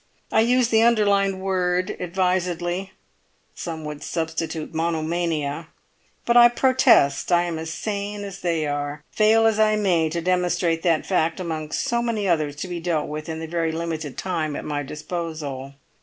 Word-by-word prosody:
I - - +3
used 245 +1 +3
the 220 0 +5
underlined 200 -4 +3
word 185 -1 0
advisedly; 180 0 -1 0.6
some 160 -2 -6
would 150 -1 -6
substitute 160 -1 -3
'monomania,' 160 -2 -1 0.6
but 235 - +2
I 240 0 +9
protest 240 - +3
I 175 0 +4
am 170 -2 -3
as 160 0 -5
sane 205 +4 -4
as 195 -1 -7
they 165 -3 0
are, 145 0 -3
fail 220 +1 +4
as 220 -1 +3
I 215 0 +4
may 175 -6 +2
to 170 +2 -2
demonstrate 175 -1 +1
that 165 -3 +1
fact 165 -3 0
among 160 -4 -4
so 235 0 0
many 225 -4 -1
others 155 -5 +1
to 155 - -5
be 175 -1 -4
dealt 165 -3 -1
with 155 +1 -6
in 160 0 -4
the - - -4
very 165 0 -1
limited 160 -4 -4
time 160 -5 -2
at - - -5
my 145 -1 -2
disposal. 150 -3 -5
170 Hz, 165 wpm, -23 LUFS, 160-195 Hz, 0.6 s, I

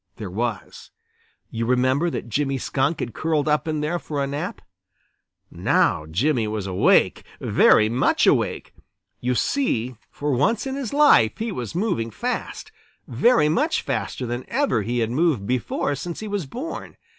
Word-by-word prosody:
There 105 -6 -7
was. 110 -1 -4 0.6
You 115 0 -2
remember 130 +6 +2
that 155 - -5
Jimmy 135 +4 -1
Skunk 140 +4 -1
had 120 - -4
curled 155 -2 0
up 150 +1 +1
in 155 -1 -1
there 160 +4 -1
for 145 -4 -3
a - - 0
nap. 145 +7 -4 0.9
Now 75 - +1
Jimmy 115 - +1
was 105 -2 -3
awake, 95 -1 +3 0.2
very 110 - +4
much 120 +4 +2
awake. - - +1 0.5
You 125 +1 -1
see, 130 - 0 0.2
for 145 0 -3
once 200 - +1
in 265 - -3
his 270 -5 -4
life 285 - +5
he 225 0 -3
was 125 - -5
moving 180 - -1
fast, 110 - -4 0.4
very 150 - +3
much 295 - +1
faster 130 - -3
than 120 +1 -4
ever 265 - +1
he 120 +4 -1
had 115 0 -1
moved 140 - +1
before 125 +4 -1
since 165 +5 -5
he 215 - -6
was 200 -7 -3
born. 260 - -7
140 Hz, 160 wpm, -23 LUFS, 115-175 Hz, 0.9 s, life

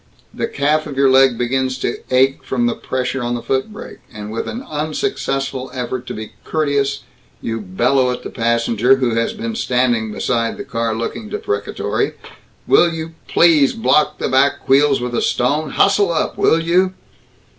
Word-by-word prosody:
The - - -2
calf 155 +2 0
of 140 -3 -7
your 135 -1 +4
leg 130 -2 +5
begins 130 +1 -1
to 120 - -2
ache 130 +1 +2
from 120 -2 -1
the 120 - +1
pressure 130 0 -3
on 120 0 -1
the 120 - -4
foot 135 - -1
brake, 210 - -10
and 105 -2 -8
with 115 - -4
an 240 +4 -5
unsuccessful 145 -4 -2
effort 125 0 -4
to - - -5
be 110 0 -7
courteous 140 -3 0 0.4
you 115 -1 -4
bellow 125 +7 +1
at 125 - -4
the - - -7
passenger, 115 +1 +2
who 125 -3 0
has 115 - 0
been 225 +1 -4
standing 125 - 0
beside 115 +1 -1
the - - -5
car 115 -1 -2
looking 115 - -5
deprecatory, 425 0 -2 0.5
"Will 170 - +4
you 160 0 -6
please 155 -5 +4
block 150 +6 +2
the - - -2
back 135 +2 +2
wheels 140 +1 +4
with 125 0 -4
a - - 0
stone 145 +5 0
hustle 200 +2 +3
up, 160 - -1
will 160 - +3
you!" 180 +3 +1
130 Hz, 175 wpm, -18 LUFS, 120-155 Hz, 0.5 s, leg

